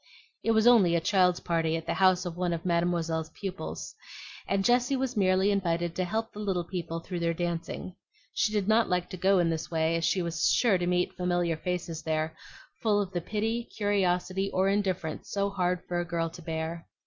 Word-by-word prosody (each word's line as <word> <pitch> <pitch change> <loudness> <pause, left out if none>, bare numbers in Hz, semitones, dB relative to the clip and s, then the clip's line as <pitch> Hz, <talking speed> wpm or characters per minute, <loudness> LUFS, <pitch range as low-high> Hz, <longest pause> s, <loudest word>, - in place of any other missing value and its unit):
It - - -2
was 220 0 +3
only 210 -8 +6
a - - +3
child's 180 0 +2
party 165 -1 0
at 165 - -7
the - - -1
house 185 -1 +3
of 175 -2 -4
one 175 -1 -1
of 165 +1 -5
Mademoiselle's 170 -2 0
pupils, 195 -1 -5 0.5
and 195 0 0
Jessie 245 +2 +3
was 260 -1 -2
merely 190 0 +3
invited 175 -3 0
to 185 - 0
help 225 +4 -3
the 210 - -9
little 190 -4 -1
people 170 -2 -4
through 175 +1 -5
their 170 0 0
dancing. 175 +1 -4 0.4
She 215 - +1
did 205 -2 0
not 220 +1 +3
like 180 -1 -1
to - - -4
go 190 +2 +3
in 170 -2 +2
this 160 -1 -3
way, 160 0 +1
as 165 - -1
she 185 +2 +1
was 170 -2 +1
sure 210 -7 +3
to 175 - -1
meet 180 0 +1
familiar 175 -2 0
faces 170 -1 -3
there, 160 0 -1 0.5
full 210 -2 +2
of 195 -2 -2
the 175 - -2
pity, 220 +5 -2
curiosity, 195 -2 +1
or 190 +1 +2
indifference 185 -5 -1
so 200 0 -1
hard 180 -2 0
for 175 -1 -1
a - - 0
girl 165 -1 -2
to 175 - -11
bear. 160 0 -4
180 Hz, 205 wpm, -28 LUFS, 170-200 Hz, 0.5 s, only